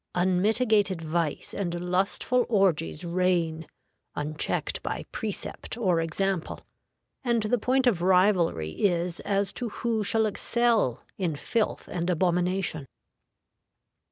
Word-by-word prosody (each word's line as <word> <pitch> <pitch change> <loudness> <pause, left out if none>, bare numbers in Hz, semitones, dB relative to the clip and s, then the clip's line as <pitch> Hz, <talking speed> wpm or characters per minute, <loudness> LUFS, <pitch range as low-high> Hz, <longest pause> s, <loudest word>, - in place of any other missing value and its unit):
Unmitigated 200 +2 +2
vice 160 -1 -2
and 175 -3 -2
lustful 190 +8 +1
orgies 180 - +1
reign, 170 -2 0 0.5
unchecked 150 +1 -2
by - - -4
precept 220 +1 -5
or 185 -8 +2
example, 180 +2 -2 0.6
and 235 -3 +1
the 230 +3 +1
point 260 +4 +2
of 210 -9 +2
rivalry 180 - +3
is 175 - 0
as 200 0 0
to 245 -2 -3
who 225 0 -1
shall 220 +2 +2
excel 225 - +1 0.2
in 170 -5 0
filth 220 +9 -1
and 175 0 -2
abomination. 180 -3 0
185 Hz, 110 wpm, -27 LUFS, 170-215 Hz, 0.6 s, rivalry